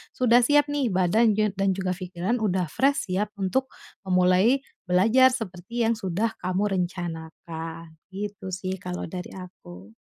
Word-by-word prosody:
sudah 245 -1 +5
siap 290 +4 +4
nih 280 -4 0
badan 205 +4 +3
jan 210 -2 +1
dan 195 0 0
juga 185 -1 -1
pikiran 185 +5 -3
udah 185 -3 +1
fresh 275 -4 +1
siap 205 +3 0
untuk 260 +8 0 0.3
memulai 190 +8 +3 0.2
belajar 225 +9 +5
seperti 225 -1 -3
yang 230 - +3
sudah 210 +1 -2
kamu 185 +3 0
rencanakan, 165 -2 -5 0.2
gitu 200 -1 -6
sih 185 0 -3
kalau 180 0 -4
dari 180 +1 -7
aku. 105 - -12
190 Hz, 145 wpm, -25 LUFS, 180-225 Hz, 0.3 s, sudah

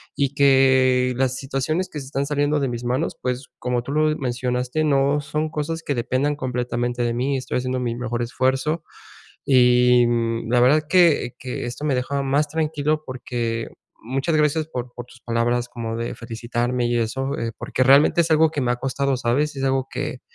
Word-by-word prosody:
y 140 -1 0
que 130 -2 +4
las 130 -1 +1
situaciones 135 +7 -2
que 150 - -6
se 135 - -8
están 140 +1 -2
saliendo 145 0 0
de 135 - 0
mis 120 0 -5
manos, 130 +6 -1
pues, 125 +1 -3
como 125 -1 -1
tú 135 - -6
lo 155 +1 +2
mencionaste, 125 +3 -1
no 140 0 +2
son 150 +2 -2
cosas 160 +2 -3
que 145 - -2
dependan 130 +4 0
completamente 120 -2 -2
de 120 0 0
mí. 130 +4 0
Estoy 130 0 -3
haciendo 130 0 -2
mi 120 -2 -2
mejor 120 -1 -3
esfuerzo. 130 +6 -1 0.6
Y, 125 -2 +5
mm, 115 -1 -1
la 120 +1 +3
verdad 130 +5 +5
es 155 - -5
que 170 -8 +3
que 125 0 -5
esto 120 +5 -6
me 145 -4 +1
dejaba 140 +2 -1
más 140 +2 +1
tranquilo 155 -1 -1
porque, 120 -3 -3 0.4
muchas 135 +7 -1
gracias 150 0 +2
por 125 -5 -6
por 120 - -7
tus 125 0 -18
palabras 120 +1 0
como 115 -2 -5
de 115 0 -4
felicitarme 120 +1 -2
y 120 - 0
eso, 135 +4 -2
eh, 115 0 -3
porque - - -2
realmente 140 +6 +5
es 165 - -4
algo 160 0 +4
que 150 - -3
me 120 - 0
ha - - -2
costado, 135 +2 -1
¿sabes? 140 +5 0
Es 135 - -2
algo 135 0 0
que 130 - -4
130 Hz, 195 wpm, -22 LUFS, 120-145 Hz, 0.6 s, Y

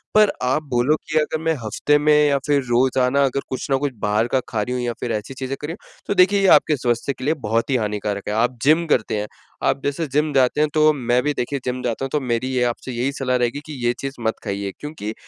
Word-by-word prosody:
पर 215 -1 +6
आप 130 +5 +1
बोलो 125 +4 +2
कि, 155 0 -4
"अगर 155 +1 -1
मैं 165 0 +2
हफ़्ते 135 +7 +2
में 150 +1 +3
या 140 -1 +3
फिर 145 -1 +3
रोज़ाना 130 +2 +2
अगर 135 +1 -1
कुछ 130 - -4
न 135 - +4
कुछ 140 0 -2
बाहर 105 +2 +1
का 130 - +1
खा 110 - -1
रही 125 +4 -3
हूँ 125 - -2
या 120 -1 -2
फिर 120 - -3
ऐसी 105 +5 -4
चीज़ें 130 +1 -4
कर 150 - -4
रही 165 - -4
हूँ।" - - -22
तो - - +1
देखिए, 200 +1 +4
ये 195 - +4
आपके 155 - 0
स्वास्थ्य 120 +2 -1
के - - -11
लिए 150 - +3
बहुत 115 +3 0
ही 135 - +2
हानिकारक 105 -3 -2
है। - - -1
आप 120 +3 +1
जिम 155 +4 +4
करते 110 -6 +1
हैं। 105 - -3 0.4
आप - - +1
जैसे 145 +3 -1
जिम 150 +1 +1
जाते 130 +2 +3
हैं, 155 - +2
तो 155 0 +5
मैं 125 -3 +1
भी, 150 +1 0
देखिए, 140 +1 -2
जिम 125 0 -2
जाता 120 +2 -2
हूँ, - - -5
तो 150 - +1
मेरी 125 -2 -1
ये 125 -1 +2
आपसे 130 - -8
यही 125 +3 -1
सलाह 130 -2 0
रहेगी 120 +3 -1
कि 155 - -8
ये 120 - +3
चीज़ 135 0 -4
मत 110 0 -1
खाइए 100 0 -3
क्योंकि 150 -8 -6
130 Hz, 265 wpm, -21 LUFS, 120-145 Hz, 0.4 s, पर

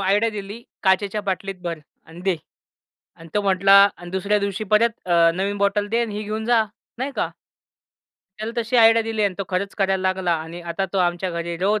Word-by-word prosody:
Idea 205 +4 +2
दिली, 205 +2 -7 0.2
"काचेच्या 200 +2 +2
बाटलीत 195 0 -3
भर 170 -2 -3 0.3
अन 165 +2 -12
दे" 190 -3 +2 0.8
अन् 165 - -12
तो 205 - +3
म्हटला 195 0 +5 0.2
अन् 175 0 -10
दुसऱ्या 200 +3 +1
दिवशी 200 +1 -2
परत 230 +2 +5 0.2
अ, 170 -1 +5
नवीन 200 +2 -1
बॉटल 200 +1 +1
दे 230 +2 +1
अन् 230 -2 -2
ही 210 +1 -4
घेऊन 215 +1 -4
जा. 235 -2 +4 0.3
नाही 265 +3 -3
का? - - -1 1.1
त्याला 220 +2 -4
तशी 235 +1 0
आयडिया 225 -1 +6
दिली 220 -1 -2
अन् 200 -3 +1
तो - - 0
खरंच 195 +2 -2
करायला 195 -1 +1
लागला 185 -2 0
आणि 170 +2 -8
आता 190 +3 -1
तो 195 - 0
आमच्या 175 +1 0
घरी 170 0 -4
रोज 205 +4 +1
200 Hz, 200 wpm, -22 LUFS, 185-215 Hz, 1.1 s, आयडिया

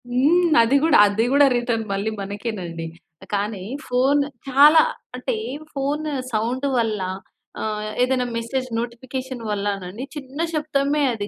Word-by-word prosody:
హ్మ్. 315 +7 +3
అది 230 +4 +3
గూడా, 320 -1 +5
అది 210 +3 +1
గూడా 285 0 +6
రిటర్న్ 240 -2 -1
మళ్ళీ 200 +3 -1
మనకేనండి. 195 -5 -5 0.5
కానీ 205 -1 -2 0.2
ఫోన్ 265 +3 +3 0.3
చాలా 290 +4 +7 0.3
అంటే - - -2 0.4
ఫోను 290 +3 -2 0.2
సౌండ్ 240 +5 -1
వల్ల 225 -3 0 0.6
ఆహ్, 215 -1 -3
ఏదైనా 250 0 +2
మెసేజ్ 255 +3 -2
నోటిఫికేషన్ 255 +2 -5
వల్లనండి, 200 +1 -3
చిన్న 280 +1 -6
శబ్దమే 295 -1 0
అది 205 -3 -4
245 Hz, 120 wpm, -22 LUFS, 215-280 Hz, 0.6 s, చాలా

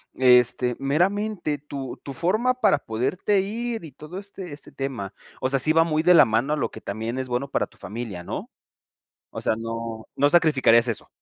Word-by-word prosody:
este, 125 -1 +4
meramente 175 +3 0
tu 140 -3 -6
tu 140 - -6
forma 215 - +1
para 205 - +3
poderte 140 - 0
ir 225 0 -3
y 145 - -11
todo 155 +7 -8
este 195 -4 -9
este 145 - -11
tema, 130 -8 -4 0.3
o 130 - 0
sea, 135 +1 +1
sí 155 - +3
va 165 +1 +5
muy 155 -1 0
de 180 +1 +6
la 155 -4 +8
mano 115 +6 0
a - - 0
lo 145 - -1
que - - -10
también 110 +5 -4
es 130 - -4
bueno 125 +3 -2
para - - 0
tu - - -23
familia, 105 -2 -6
¿no? 90 - -6 0.8
O - - -6
sea, 110 - 0
no, 115 0 -5
no 145 +1 +3
sacrificarías 135 -8 +4
eso. 115 -3 -3
140 Hz, 200 wpm, -24 LUFS, 120-175 Hz, 0.8 s, la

